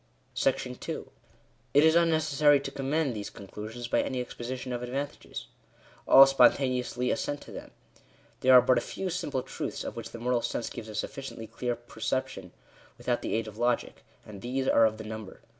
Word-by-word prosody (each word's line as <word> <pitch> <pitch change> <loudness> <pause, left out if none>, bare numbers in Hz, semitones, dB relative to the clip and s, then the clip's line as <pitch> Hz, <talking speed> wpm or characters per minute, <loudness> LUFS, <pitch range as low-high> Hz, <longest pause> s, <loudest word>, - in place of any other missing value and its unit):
§*• - - -2 0.7
It 145 - +7
is 160 0 +6
unnecessary 155 -3 +4
to 135 - -5
commend 140 0 -1
these 105 -1 -5
conclusions 110 +4 -8
by - - +2
any 130 - -2
exposition 125 +1 -5
of 120 - -3
advantages. 135 +4 -5 0.6
All 135 +1 +10
spontaneously 125 -2 +3
assent 145 0 -2
to - - -12
them. - - -8 0.7
There 130 0 +8
are 125 - 0
a 120 - +2
few 190 +7 -4
simple 150 -7 -2
truths - - -5
of - - -6
which - - -6
the - - -9
moral 120 +1 0
sense 120 - -3
gives 110 -2 -7
a 105 - -8
sufficiently 135 0 -5
clear 120 +2 -3
perception 120 -4 -4 0.5
without - - -1
the - - -2
aid 115 0 -1
of 110 +1 -10
logic; 120 0 0 0.2
and 100 -2 -10
these 130 +2 -2
are 115 - +6
of 110 0 -4
the 110 - -7
number. 110 -2 -8
125 Hz, 175 wpm, -29 LUFS, 115-135 Hz, 0.7 s, All